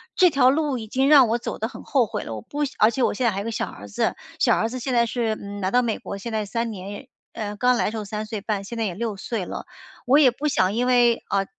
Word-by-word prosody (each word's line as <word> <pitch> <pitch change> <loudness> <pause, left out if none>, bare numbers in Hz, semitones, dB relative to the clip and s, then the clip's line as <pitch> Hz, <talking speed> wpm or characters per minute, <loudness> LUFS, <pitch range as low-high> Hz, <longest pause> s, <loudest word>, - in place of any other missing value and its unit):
这 365 - +6
条 265 -4 +4
路 290 -1 +1
已 220 -2 -7
经 265 +5 +1
让 275 -5 +8
我 230 +2 +1
走 235 - -5
得 220 - -1
很 - - -11
后 260 -4 +2
悔 - - -4
了。 - - -6
我 110 - -6
不 295 - -4
想 280 - -3
而 215 - +6
且 245 +2 -1
我 - - +2
现 250 - -1
在 230 - +4
还 195 - -3
有 200 - -3
一 - - -9
个 230 - -2
小 - - -2
儿 100 +1 -10
子， 100 - 0 0.2
小 - - +4
儿 225 - 0
子 255 +2 -5
现 255 +1 -3
在 235 -1 +4
是， 230 -2 -1
嗯， 200 -1 -8
来 185 - 0
到 250 - +4
美 230 -3 -1
国 200 - -6
现 230 +4 -6
在 215 -1 -1
3 230 +3 -2
年 200 +5 -8 0.3
呃， 210 -2 -4
刚 250 +3 +3
来 - - +1
的 - - -1
时 225 - -5
候 215 - -4
3 210 +1 -4
岁 215 0 -5
半， 210 -1 -2
现 230 +4 -7
在 225 - 0
也 185 - -2
6 220 -2 -3
岁 215 0 -3
了， - - -6 0.4
我 265 +3 +5
也 270 -5 +6
不 290 +5 -3
想 190 -9 +2
因 245 +3 0
为， 240 -2 +4
啊， 195 -1 +1
230 Hz, 320 characters per minute, -23 LUFS, 205-250 Hz, 0.4 s, 让